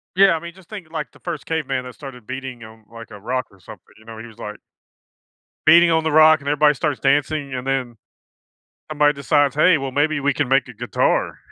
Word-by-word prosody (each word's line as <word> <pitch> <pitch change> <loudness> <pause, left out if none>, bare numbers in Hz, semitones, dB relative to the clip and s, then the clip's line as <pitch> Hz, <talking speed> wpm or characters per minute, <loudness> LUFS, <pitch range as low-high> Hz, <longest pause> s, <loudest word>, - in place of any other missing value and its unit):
Yeah, 195 -2 +5
I - - -6
mean, 170 +1 -9
just 185 -2 -20
thinking, 180 -7 -10
like, 150 -6 -5
the - - -21
1st 170 -5 -6
caveman 135 -5 -2
that 125 -1 -10
started 130 -5 -11
beating 130 -2 -7
on, 110 0 -15
like, 115 -1 -12
a 105 - -10
rock 125 +4 -3
or 95 - -21
something, - - -13 0.2
you 110 - -20
know, 115 -1 -10
he 110 - -9
was 115 -2 -15
like 105 0 -7 1.1
beating 170 +2 +7
on 160 -1 +2
the 160 - -1
rock 155 0 +6
and 140 - -10
everybody 150 0 +3
starts 145 +2 -2
dancing 140 0 0
and 125 +1 -5
then 130 -4 -2 0.9
somebody 150 -1 +3
decides, 145 -1 +1
"Hey, 155 +2 +4
well, 135 -1 -5
maybe 145 +2 0
we 140 0 0
can 145 -1 -1
make 135 +1 +2
a 125 - -11
guitar." 115 0 -1
140 Hz, 225 wpm, -20 LUFS, 125-155 Hz, 1.1 s, beating